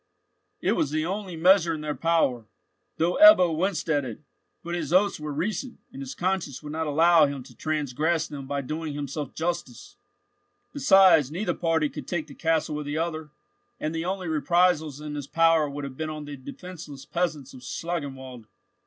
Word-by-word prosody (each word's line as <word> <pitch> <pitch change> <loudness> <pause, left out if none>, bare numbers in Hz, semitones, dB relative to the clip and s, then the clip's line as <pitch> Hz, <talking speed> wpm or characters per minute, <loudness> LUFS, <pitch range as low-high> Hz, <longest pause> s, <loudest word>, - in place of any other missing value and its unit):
It - - +1
was 145 - +1
the 155 +1 -1
only 190 0 -4
measure 170 0 +4
in 155 - -7
their 150 -1 -2
power, 145 -9 +1 0.5
though 170 - +1
Ebbo 185 - +8
winced 170 -1 -1
at 145 -3 +1
it; 120 -1 -7 0.4
but 170 +1 -5
his 175 - -3
oaths 195 +1 +3
were 150 0 -5
recent, 210 - -3 0.2
and 135 - -8
his 135 -1 -6
conscience 180 -7 -2
would 150 - -7
not 160 +1 -2
allow 160 +1 +5
him 140 -2 -5
to - - -16
transgress 155 +2 -1
them 140 -3 -8
by 140 0 -2
doing 155 +2 -5
himself 145 -1 -5
justice. 165 - -4 0.8
Besides, 190 - +5
neither 180 +8 -2
party 165 -3 +1
could - - -8
take 170 -4 -2
the 145 - -13
castle 160 -1 0
of 150 - -6
the 145 +2 -3
other, 160 -2 -3 0.5
and 155 +1 -2
the 165 +1 -3
only 185 0 -3
reprisals 160 -1 +2
in 150 0 -6
his 145 -2 -5
power 165 -2 +3
would 145 +1 -6
have 135 -2 -7
been 155 -1 -3
on 155 -1 -6
the 145 0 -7
defenceless 145 0 -10
peasants 155 -6 -2
of 130 - -12
Schlangenwald. 130 -6 -5
155 Hz, 185 wpm, -26 LUFS, 145-170 Hz, 0.8 s, Ebbo